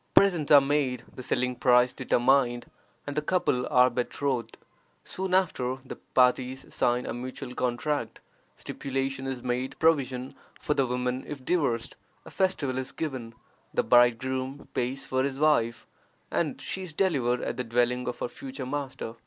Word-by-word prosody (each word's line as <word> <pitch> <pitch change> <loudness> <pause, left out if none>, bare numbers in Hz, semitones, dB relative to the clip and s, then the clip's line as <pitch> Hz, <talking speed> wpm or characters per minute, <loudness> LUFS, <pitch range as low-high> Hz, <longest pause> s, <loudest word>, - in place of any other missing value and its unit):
Presents 175 -7 +4
are 145 -1 +10
made, 135 -4 0
the - - -8
selling 125 0 0
price 125 0 +4
determined, 120 -1 +2 0.4
and 145 - -5
the 150 - +1
couple 150 -7 +1
are 125 0 +5
betrothed. 125 -1 -2 0.5
Soon 190 0 -2
after, 130 -9 +1
the - - -7
parties 130 +1 +1
sign 120 +1 +1
a - - -3
mutual 125 +1 -6
contract; 125 +4 -2 0.4
stipulation 135 0 -3
is 130 -2 -4
made 125 +2 -2
for - - -35
provision 135 -5 +1 0.3
for - - 0
the 135 -3 +1
woman 125 +1 -1
if 140 -3 -7
divorced; 135 -10 0 0.3
a - - -11
festival 145 -9 0
is 130 - -4
given; 130 -8 -5 0.4
the - - +3
bridegroom 130 +3 +2
pays 130 +2 -2
for 130 0 0
his 135 0 -1
wife, 120 -6 +2 0.5
and - - -1
she 190 - -4
is 180 -4 -7
delivered 135 -10 +1
at - - -3
the 125 - -1
dwelling 125 +1 +1
of 125 - -3
her - - 0
future 130 +2 -7
master. 130 -4 -4
130 Hz, 160 wpm, -28 LUFS, 125-140 Hz, 0.5 s, are